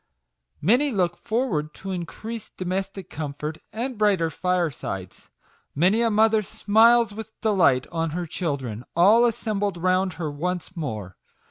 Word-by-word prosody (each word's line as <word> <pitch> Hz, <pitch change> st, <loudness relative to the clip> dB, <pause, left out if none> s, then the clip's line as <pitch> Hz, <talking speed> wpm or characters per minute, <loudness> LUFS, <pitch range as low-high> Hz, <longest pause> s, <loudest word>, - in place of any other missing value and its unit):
Many 245 Hz, -, +4 dB
look 180 Hz, -5 st, +1 dB
forward 175 Hz, -, -2 dB
to 195 Hz, -, -6 dB
increased 210 Hz, +5 st, -6 dB
domestic 190 Hz, 0 st, -3 dB
comfort, 150 Hz, +1 st, -5 dB
and 240 Hz, +1 st, -4 dB
brighter 190 Hz, -6 st, +2 dB
firesides. 155 Hz, -, -3 dB, 0.5 s
Many 185 Hz, +10 st, +3 dB
a 230 Hz, -, +3 dB
mother 220 Hz, 0 st, +4 dB
smiles 225 Hz, +2 st, +4 dB
with 220 Hz, +1 st, -9 dB
delight 180 Hz, -, +3 dB
on 165 Hz, -1 st, -1 dB
her 175 Hz, +3 st, -3 dB
children, 140 Hz, -, -3 dB
all 210 Hz, +8 st, +6 dB
assembled 205 Hz, -4 st, -1 dB
round 185 Hz, +1 st, +1 dB
her 160 Hz, -2 st, -4 dB
once 180 Hz, +4 st, -4 dB
more. 110 Hz, -, -5 dB
185 Hz, 130 wpm, -24 LUFS, 160-215 Hz, 0.5 s, all